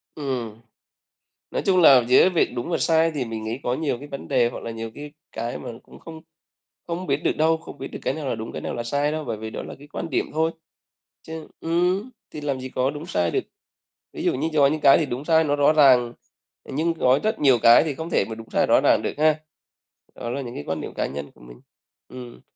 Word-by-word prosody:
Ừm. 120 -6 -4 0.9
Nói - - -1
chung 185 -2 +4
là 130 -6 +8
giữa 130 +8 +6
việc 175 - +2
đúng 120 +6 -4
và 170 - +1
sai 165 0 +3
thì 140 -5 -3
mình 110 -1 -5
nghĩ 115 +4 -4
có 125 - 0
nhiều 145 -3 -1
cái 145 - -10
vấn 140 - -8
đề 120 - +2
hoặc - - -8
là 115 - -5
nhiều 115 0 -6
cái 145 0 -8 0.2
cái 115 +2 -4
mà - - -7
cũng - - -16
không 160 -1 -11 0.7
không 175 +2 -4
biết 140 - +2
được - - +1
đâu, 160 +1 +3
không 160 - -12
biết 135 - -6
được - - -8
cái 135 - -1
nào 150 -3 -5
là - - 0
đúng, 110 0 -7
cái - - -6
nào - - -4
là 120 - -3
sai 145 +5 0
đâu, 155 -1 -3
bởi 115 -4 -3
vì 110 +1 -7
đó - - -6
là - - -8
cái 145 - -14
quan 165 - -5
điểm - - -1
thôi. 160 +1 +1 0.7
Chứ 160 -1 -8
ừm, 180 +7 0 0.2
thì 150 - -7
làm 140 -3 -2
gì 130 - -6
có 130 +1 0
đúng 150 +3 -7
sai 85 - 0
được. - - 0 0.7
Ví - - -6
dụ - - +2
như 155 +5 -1
có 145 -2 +5
những 155 +1 -1
cái 140 -1 +7
thì 155 - +1
đúng 130 +2 -5
sai 160 0 +4
nó 145 -1 +1
rõ 145 +2 +4
ràng, 125 -5 +5 0.5
nhưng 160 +5 -1
có 130 -4 +3
rất 215 - 0
nhiều 135 -4 +5
cái 115 +5 +8
thì 150 -4 -3
không 160 +3 -6
thể 100 - +2
mà 110 - -5
đúng 115 0 -11
sai - - +2
rõ - - +5
ràng - - +4
được - - -3
ha? 155 0 +3 0.8
Đó 120 - -6
là 140 +3 -3
những 120 -2 -7
cái 75 - -5
quan 80 - -2
điểm - - -7
cá - - -1
nhân 70 +1 -7
của 65 - -22
mình. - - -14 0.5
Ừm. 125 -2 -10
140 Hz, 255 wpm, -23 LUFS, 120-160 Hz, 0.9 s, là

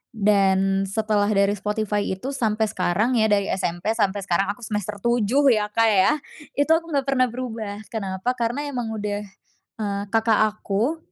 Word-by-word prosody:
dan 195 -2 +2
setelah 210 0 0
dari 200 -1 +3
Spotify 210 0 -1
itu 190 +9 -4
sampai 220 -5 0
sekarang 215 +5 +1
ya 220 - +4
dari 200 -1 +1
SMP 180 +2 -1
sampai 205 -3 0
sekarang 190 +1 +1
aku 240 - -17
semester 210 -1 -3
7 245 +4 +3
ya 210 -2 +1
Kak 225 +1 +3
ya, 200 +9 +4 0.4
itu 290 +3 +1
aku 330 +1 +3
nggak 280 -2 +1
pernah 255 -2 +3
berubah. 225 -4 -5
Kenapa? 195 +1 -2
Karena 240 +5 -1
emang 235 -4 -3
udah, 205 -1 -3 0.6
eee, 200 -1 -2
Kakak 220 -1 +3
aku 215 +8 -2
215 Hz, 160 wpm, -23 LUFS, 200-235 Hz, 0.6 s, ya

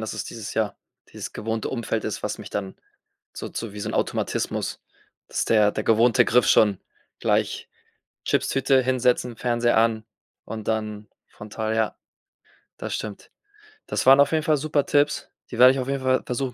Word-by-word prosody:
dass 110 - -4
es 110 - -4
dieses, 110 -3 -7
ja 110 -2 -1 0.4
dieses - - -7
gewohnte 110 0 -3
Umfeld 115 -3 -2
ist, 110 - -4
was - - -3
mich - - -9
dann 95 -2 -4 0.6
so - - -6
zu 115 -3 -6
wie 105 - -8
so - - -3
'n - - -4
Automatismus, - - -2 0.5
dass - - -1
der 105 -2 +4
der 105 - -3
gewohnte 115 +1 +4
Griff 125 -1 +3
schon 105 -3 +4 0.4
gleich - - 0 0.6
Chipstüte, 135 0 +2
hinsetzen, 125 -2 +1
Fernseher 120 -1 +1
an 110 -1 +2 0.4
und 110 -1 -7
dann 105 -1 -2 0.2
frontal 110 +1 -5
ja. 110 -1 0 0.8
Das - - -4
stimmt. 105 -2 -6 0.6
Das - - -2
waren 135 +1 +8
auf 140 +2 +5
jeden 155 -1 +1
Fall 155 -1 +2
super 145 0 0
Tipps. 145 +1 +1 0.2
Die 120 - -6
werde 130 +1 +9
ich 135 - -3
auf 130 - -3
jeden 140 -1 -1
Fall 130 0 +2
versuchen, 125 0 -3
115 Hz, 175 wpm, -24 LUFS, 110-130 Hz, 0.8 s, werde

